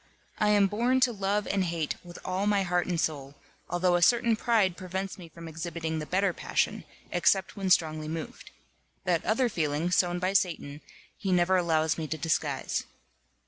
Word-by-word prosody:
I 210 - +3
am 205 -1 +5
born 235 +6 +1
to 250 -1 +4
love 200 0 0
and 195 -1 0
hate 165 -4 -1
with 175 -1 -11
all 185 +2 -1
my 205 -2 +3
heart 180 -1 0
and 175 -2 -1
soul, 140 -3 -2 0.3
although 175 +1 +2
a 175 - +1
certain 235 +4 +4
pride 215 -5 +2
prevents 190 +1 -5
me 170 -2 -10
from 165 +1 -10
exhibiting 160 0 -4
the 150 - -5
better 190 0 +1
passion, - - -1 0.3
except 190 -1 +2
when 195 -2 -2
strongly 155 -3 +2
moved. 160 0 -6 0.6
That 175 -3 +1
other 235 +4 +2
feeling, 160 -4 -1
sown 175 -1 +2
by 185 +1 -1
Satan, 160 -6 0 0.4
he 195 - -2
never 180 +1 +3
allows 160 -3 +1
me 155 - -3
to 160 - -3
disguise. 155 -4 -1
180 Hz, 180 wpm, -28 LUFS, 160-195 Hz, 0.6 s, am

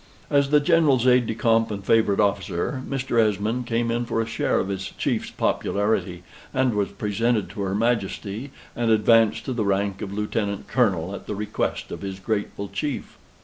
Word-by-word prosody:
As 140 -1 +3
the 150 0 +5
General's 145 -6 +3
aide 125 -2 +4
de 115 - -2
camp 115 0 +2
and 100 -2 -5
favorite 110 -3 +3
officer, 100 +3 0
Mr. 130 -4 +1
Esmond 110 +3 0
came 115 0 0
in 120 +1 -1
for 115 - -1
a 115 - +1
share 115 0 0
of 95 - -2
his 95 -1 -3
chief's - - -1
popularity, 100 -4 -1 0.3
and 130 -2 +2
was 100 -1 0
presented 110 +1 -1
to 100 - -6
her 95 0 -1
Majesty, 115 +1 -1 0.3
and 120 -1 0
advanced 110 0 +4
to 130 - -2
the 115 -3 -1
rank 100 0 0
of 100 - -4
Lieutenant 105 0 -2
Colonel, 95 -8 +1
at - - -8
the 105 - -3
request 105 +1 -3
of - - -6
his 95 -1 -5
grateful 100 0 -3
chief. 115 +8 -4
110 Hz, 185 wpm, -24 LUFS, 100-120 Hz, 0.3 s, the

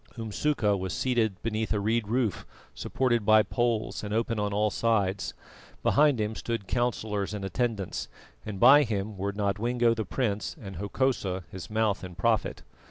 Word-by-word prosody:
Umsuka 110 -1 0
was 95 -1 -3
seated 115 -7 0
beneath 110 -1 -2
a 105 - +1
reed 110 +1 0
roof 115 -3 0 0.3
supported 120 -4 0
by 110 +1 +6
poles 120 -3 -1
and 105 - -5
open 115 -1 0
on 105 0 -1
all 105 +1 +1
sides; 105 -4 0 0.5
behind 145 -4 +4
him 105 0 -1
stood 115 -3 -4
councillors 110 -4 -1
and 100 -1 -4
attendants, 105 0 -2 0.4
and 105 -3 -6
by 145 +7 +8
him 105 -5 -2
were 100 +1 -2
Nodwengo 115 +4 +1
the 110 -1 -2
prince, 105 0 -2
and 95 -5 -8
Hokosa, 100 -3 -1
his 95 -2 -8
mouth 110 -2 0
and 90 -2 -8
prophet. 110 +2 0
110 Hz, 160 wpm, -28 LUFS, 100-115 Hz, 0.5 s, by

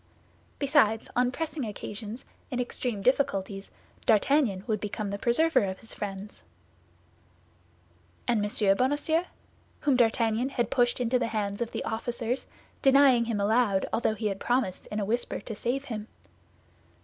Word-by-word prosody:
Besides, 270 -7 +3
on 245 +1 +3
pressing 315 0 -3
occasions, 215 +2 -6 0.2
in 250 - -3
extreme 240 -4 -2
difficulties, 195 -6 0 0.4
D'Artagnan 220 -3 +3
would 215 -3 0
become 210 0 -4
the 200 - -4
preserver 315 +5 +3
of 190 -1 -4
his 225 - -8
friends. 200 0 -6 1.8
And 230 -4 +2
M. 205 -1 +2
Bonacieux, 295 +6 +1 0.6
whom 280 -3 +3
D'Artagnan 230 +1 +2
had 240 -5 -1
pushed 245 -1 +2
into 250 +1 +2
the 245 - 0
hands 205 -1 -2
of 235 - -1
the - - -4
officers, 235 +2 -2 0.3
denying 270 -3 +6
him 225 -3 -1
aloud 205 -1 +2
although 220 -1 +1
he 220 - -5
had 195 -2 -1
promised 240 -6 -1
in 210 - -3
a 205 - -1
whisper 235 +4 -1
to 220 - -7
save 265 +6 -2
him? 220 -5 -5
230 Hz, 145 wpm, -28 LUFS, 210-255 Hz, 1.8 s, denying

